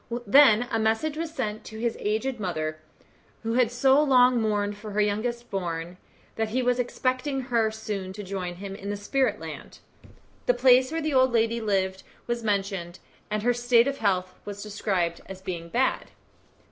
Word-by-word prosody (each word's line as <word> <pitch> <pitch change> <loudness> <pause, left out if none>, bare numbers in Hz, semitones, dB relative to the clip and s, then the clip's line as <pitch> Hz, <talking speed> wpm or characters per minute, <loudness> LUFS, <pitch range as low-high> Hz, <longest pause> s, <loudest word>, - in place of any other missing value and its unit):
Then 245 0 +6
a 225 - +1
message 225 +8 0
was 320 0 -4
sent 215 -8 -3
to 220 - -9
his 230 0 -1
aged 225 +4 -1
mother, 155 -5 -3 0.6
who 225 0 -1
had 245 -2 +3
so 265 +4 +4
long 250 -4 +5
mourned 205 -1 0
for 210 0 -9
her 210 - 0
youngest 235 +4 -2
born, 175 -2 -3 0.4
that 220 -1 0
he 255 +4 0
was 250 0 +1
expecting 255 +3 -1
her 235 -4 +1
soon 210 -4 -5
to 205 +1 -7
join 185 -2 -4
him 195 +1 -7
in 200 0 -7
the 205 - -2
spirit 260 +6 0
land. - - -9 0.7
The 245 - +4
place 255 +1 +5
where 325 0 -1
the 310 -1 -1
old 260 -1 +4
lady 230 0 +2
lived 190 -3 0 0.2
was 240 -1 -2
mentioned, 195 -4 -2 0.3
and 210 0 -2
her 245 +1 +3
state 240 0 +3
of 275 0 -2
health 185 -3 0
was 205 0 -7
described 190 -5 -1
as 190 -1 -8
being 175 -3 -6
bad. 260 +7 0
220 Hz, 180 wpm, -26 LUFS, 195-245 Hz, 0.7 s, Then